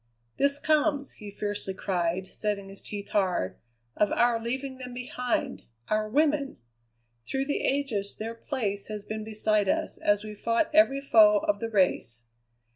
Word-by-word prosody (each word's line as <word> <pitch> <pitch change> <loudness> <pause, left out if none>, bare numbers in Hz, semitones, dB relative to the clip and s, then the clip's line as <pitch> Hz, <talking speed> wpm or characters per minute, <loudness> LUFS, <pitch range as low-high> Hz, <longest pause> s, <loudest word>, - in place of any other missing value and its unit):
"This 280 0 +3
comes," 295 -2 +1
he 210 - -8
fiercely 205 -1 -3
cried, 180 -1 -1
setting 205 -2 -3
his 195 - -9
teeth 205 -1 -7
hard, 180 - 0 0.4
"of 210 - +2
our 235 -1 +3
leaving 260 +3 -4
them 250 -1 -7
behind 250 +1 -2 0.2
our 215 0 +1
women! 290 +1 +1 0.7
Through 270 0 -1
the 285 - -1
ages 250 -8 -1
their 225 +1 -5
place 215 -5 -3
has 210 -1 -6
been 215 0 -4
beside 215 -2 +1
us - - -1
as 205 0 +2
we 215 0 -7
fought 230 +7 0
every 285 -3 +5
foe 215 -6 +5
of 205 -1 +1
the 230 - -3
race. 180 - +1
215 Hz, 155 wpm, -28 LUFS, 205-265 Hz, 0.7 s, every